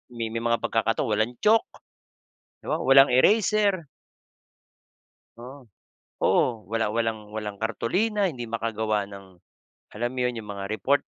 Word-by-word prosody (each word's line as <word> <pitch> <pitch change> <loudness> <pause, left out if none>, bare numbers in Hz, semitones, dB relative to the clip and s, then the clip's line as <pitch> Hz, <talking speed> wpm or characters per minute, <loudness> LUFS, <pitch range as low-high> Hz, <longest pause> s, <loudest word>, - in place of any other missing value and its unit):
may 115 -1 -3
may 115 - -2
mga 115 0 0
pagkakataong 115 +1 0
walang 110 +3 0
chalk, 220 +1 +4 1.0
di - - -6
ba, - - +1
walang 135 0 +6
eraser 200 - +3 1.5
Oo. 125 +1 -12 0.5
Oo. 115 -4 +2
Wala 115 -1 0
walang 110 -2 -2
walang 105 -2 -5
kartolina, 185 - 0
hindi 120 -4 -7
makagawa 110 -2 -1
ng 95 -2 -12 0.6
alam 120 +3 -1
mo - - -3
'yon, 125 -2 -1
yung 105 - -10
mga 100 -1 -6
report 140 +6 +1
115 Hz, 135 wpm, -25 LUFS, 110-135 Hz, 1.5 s, walang